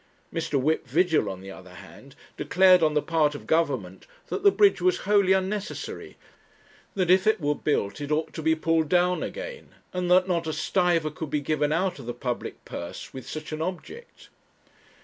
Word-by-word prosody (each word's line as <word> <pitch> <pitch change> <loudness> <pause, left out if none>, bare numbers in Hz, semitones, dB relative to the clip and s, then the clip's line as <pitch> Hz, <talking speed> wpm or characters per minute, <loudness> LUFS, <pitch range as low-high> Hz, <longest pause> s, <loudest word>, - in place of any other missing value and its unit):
Mr. 160 -4 -1
Whip 155 +1 0
Vigil, 160 - +2
on 95 -1 -7
the 95 0 -9
other 90 -1 -12
hand, - - -14 0.2
declared 185 -1 +4
on 155 -1 +2
the 150 - +2
part 155 -3 +1
of - - -9
Government 130 - -1 0.2
that - - -3
the 400 - +7
bridge 400 0 +3
was 370 0 +2
wholly 200 -2 +3
unnecessary; 190 +2 -2 0.8
that 185 -3 +2
if 190 +3 +4
it 220 -1 +3
were 150 -2 +1
built 145 -8 -2
it 145 +1 -5
ought 155 +1 -1
to 160 - -5
be 160 +1 +2
pulled 160 -1 0
down 180 +1 +2
again; - - -7 0.2
and 180 -1 -2
that 185 +1 +5
not 170 -3 -1
a 155 - -2
stiver 170 -4 +1
could 160 0 -6
be 150 - 0
given 150 0 0
out 180 +1 0
of 125 - -10
the 120 - -4
public 120 0 -5
purse 85 - -8
with 130 -2 -9
such 155 0 -6
an 155 0 -4
object. 185 - -7
160 Hz, 190 wpm, -26 LUFS, 145-185 Hz, 0.8 s, the